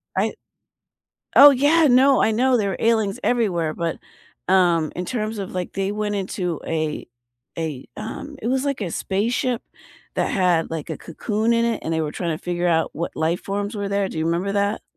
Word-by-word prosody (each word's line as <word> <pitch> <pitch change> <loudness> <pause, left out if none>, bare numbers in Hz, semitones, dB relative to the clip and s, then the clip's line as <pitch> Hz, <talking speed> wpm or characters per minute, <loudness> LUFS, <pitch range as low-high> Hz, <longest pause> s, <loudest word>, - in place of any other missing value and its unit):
I - - +1 1.0
Oh, 285 - +11
yeah, 290 +4 +4
no, 265 +1 +5
I 225 - +3
know 250 +3 +3
there 200 -2 0
were 190 - -3
aliens 225 -1 +1
everywhere, 180 -10 +1
but, 170 -1 -3 0.5
um, 175 -4 +3
in 180 - -3
terms 220 -1 -3
of, 195 -2 -5
like, 180 -1 -4
they 195 +1 -1
went 210 0 -2
into 185 -4 -3
a 155 -2 -2 0.5
a 155 -6 -4
um, 290 0 -7
it 225 - -3
was 260 +2 0
like 275 -5 -2
a 175 - -3
spaceship 230 +7 -1 0.5
that - - +1
had, 180 -4 +2
like, 160 -3 -5
a - - -4
cocoon 215 +7 -1
in 230 0 +2
it 235 -1 0
and 165 - -2
they 160 - 0
were 150 -1 -2
trying 170 -3 -2
to - - -23
figure 175 0 -1
out 165 -1 +1
what 170 +2 -4
life 165 +2 0
forms 205 +2 -3
were 200 -1 -3
there. 200 -1 0
Do - - -7
you 160 - -1
remember 175 +4 0
that? 205 +1 0
200 Hz, 200 wpm, -22 LUFS, 170-230 Hz, 1.0 s, Oh